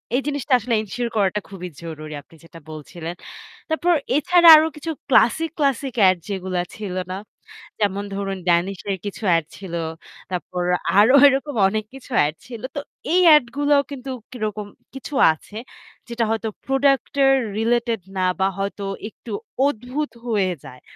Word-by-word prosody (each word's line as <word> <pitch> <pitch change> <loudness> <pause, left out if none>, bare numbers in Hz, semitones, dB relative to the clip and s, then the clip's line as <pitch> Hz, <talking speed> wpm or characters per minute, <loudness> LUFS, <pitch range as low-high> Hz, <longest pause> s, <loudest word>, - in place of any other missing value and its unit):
এই 270 - +2
জিনিসটা 285 -2 -1
আসলে 235 +1 -3
এনশিওর 235 +3 -4
করাটা 205 0 +1
খুবই 180 -2 -7
জরুরি 155 -2 -7
আপনি 165 - -21
যেটা 165 0 -13
বলছিলেন। 165 +3 -7 0.5
তারপর 340 +2 +2 0.2
এছাড়া 345 +3 +4
আরও 315 +1 +3
কিছু 310 +2 -5 0.2
ক্লাসিক, 320 +6 +4
ক্লাসিক 275 -2 0
এড 185 -1 +4
যেগুলো 190 -2 -3 0.2
ছিল 200 -4 -6 0.2
না? 185 - -3 0.6
যেমন 200 -1 0
ধরুন 195 -1 -3
'Danish' 175 +2 +1
এর 195 - -1
কিছু 205 +2 -6
এড 165 -2 0
ছিল। 190 -4 -9 0.6
তারপর 180 0 -3 0.4
আরো 230 +6 +6
এরকম 275 +1 0
অনেক 215 +2 -1
কিছু 270 0 -13
এড 150 +2 -3
ছিল। 235 -3 -8
তো 285 - -1 0.3
এই 365 - +5
এড 295 - +4
গুলাও 290 -1 +3
কিন্তু 270 -1 -7 0.2
কিরকম 215 -3 -4 0.3
কিছু 270 +2 -8 0.2
আছে 205 +7 -13 0.5
যেটা 235 0 -1
হয়তো 225 0 -1 0.2
প্রোডাক্ট 270 0 +1 0.4
রিলেটেড 230 -1 0 0.2
না 185 - +1 0.2
বা 190 - +3
হয়তো 200 +1 -3 0.3
একটু 230 - -12 0.4
অদ্ভুত 265 +4 -3 0.2
হয়ে 200 -5 +1
যায়। 125 -1 -12
220 Hz, 150 wpm, -22 LUFS, 190-270 Hz, 0.6 s, আরো